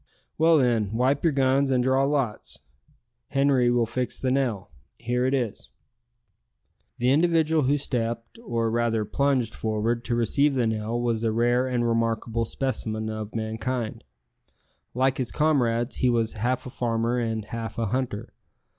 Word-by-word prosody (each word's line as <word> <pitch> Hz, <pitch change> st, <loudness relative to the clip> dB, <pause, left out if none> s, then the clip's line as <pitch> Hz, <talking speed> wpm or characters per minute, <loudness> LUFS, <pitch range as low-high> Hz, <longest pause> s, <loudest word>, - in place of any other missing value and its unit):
"Well, 160 Hz, +1 st, +5 dB
then, 115 Hz, -6 st, +1 dB
wipe 130 Hz, +5 st, +1 dB
your 165 Hz, -, +4 dB
guns 135 Hz, 0 st, +2 dB
and 125 Hz, -2 st, +2 dB
draw 130 Hz, +1 st, +3 dB
lots. 135 Hz, -7 st, -2 dB, 0.7 s
Henri 135 Hz, -3 st, +3 dB
will 120 Hz, -1 st, +2 dB
fix 125 Hz, +2 st, -3 dB
the 130 Hz, -, 0 dB
nail. 120 Hz, -9 st, -1 dB, 0.3 s
Here 125 Hz, +2 st, 0 dB
it 130 Hz, -, 0 dB
is." 120 Hz, -6 st, -3 dB, 1.3 s
The 125 Hz, +2 st, +2 dB
individual 160 Hz, +1 st, +3 dB
who 145 Hz, +3 st, +3 dB
stepped, 115 Hz, -, -3 dB
or 115 Hz, -, -1 dB
rather 115 Hz, -2 st, 0 dB
plunged 130 Hz, -1 st, 0 dB
forward 110 Hz, +2 st, -1 dB
to 120 Hz, -, 0 dB
receive 140 Hz, +5 st, +2 dB
the 125 Hz, -2 st, +2 dB
nail 110 Hz, +1 st, -1 dB
was 115 Hz, -2 st, -1 dB
a 115 Hz, -, +1 dB
rare 120 Hz, +3 st, +2 dB
and 120 Hz, -2 st, 0 dB
remarkable 115 Hz, 0 st, 0 dB
specimen 110 Hz, -4 st, -3 dB
of 110 Hz, 0 st, -6 dB
mankind. 110 Hz, +1 st, -3 dB, 0.9 s
Like 130 Hz, +1 st, +1 dB
his 125 Hz, -3 st, -1 dB
comrades, 125 Hz, -6 st, +1 dB
he 125 Hz, -, +2 dB
was 115 Hz, -2 st, +1 dB
half 125 Hz, +4 st, -1 dB
a 125 Hz, -, -7 dB
farmer 120 Hz, 0 st, 0 dB
and 110 Hz, -2 st, -2 dB
half 115 Hz, 0 st, -6 dB
a 115 Hz, -, 0 dB
hunter. 120 Hz, -2 st, -3 dB
120 Hz, 155 wpm, -25 LUFS, 115-130 Hz, 1.3 s, Well